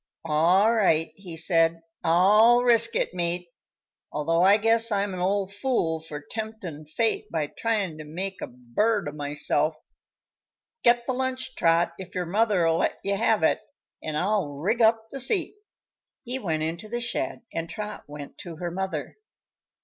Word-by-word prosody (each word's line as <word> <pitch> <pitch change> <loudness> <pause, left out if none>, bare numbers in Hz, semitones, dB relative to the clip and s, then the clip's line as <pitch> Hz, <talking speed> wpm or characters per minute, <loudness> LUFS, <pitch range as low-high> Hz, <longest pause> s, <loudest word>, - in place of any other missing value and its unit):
"All 175 +8 +4
right," 165 -8 +2
he 180 -5 -9
said; 165 0 +1 0.2
"I'll 210 +8 +5
risk 230 -1 +4
it, - - 0
mate, 175 0 -2 0.6
although 165 +3 +1
I 195 +3 +6
guess 225 +1 +2
I'm 200 -1 0
an 180 - -5
old 195 +1 0
fool 200 -8 0
for 155 -2 -7
temptin' 180 -3 -7
fate 215 +5 -1
by 160 -3 -1
tryin' 200 -2 -2
to - - -6
make 185 +6 -5
a - - -4
bird 145 - -1
o' - - -3
myself. 150 +1 0 1.1
Get 240 0 +4
the 260 - -1
lunch, 260 0 -3
Trot, 170 +1 +2
if 190 0 -9
your 180 -1 -1
mother'll 180 -4 +2
let - - 0
you 200 0 0
have 220 -3 +2
it, - - +3 0.4
and 155 -1 -3
I'll 195 +1 +1
rig 200 - -1
up 225 0 +3
the 275 - -6
seat." 335 - +2 0.7
He 250 +2 -3
went 160 -8 -1
into 170 +6 -4
the 240 +2 -2
shed 240 0 -3
and 165 0 -3
Trot 210 -1 -6
went 145 -1 -10
to 170 -2 -8
her 175 +2 -4
mother. 190 +2 -4
190 Hz, 165 wpm, -26 LUFS, 165-220 Hz, 1.1 s, I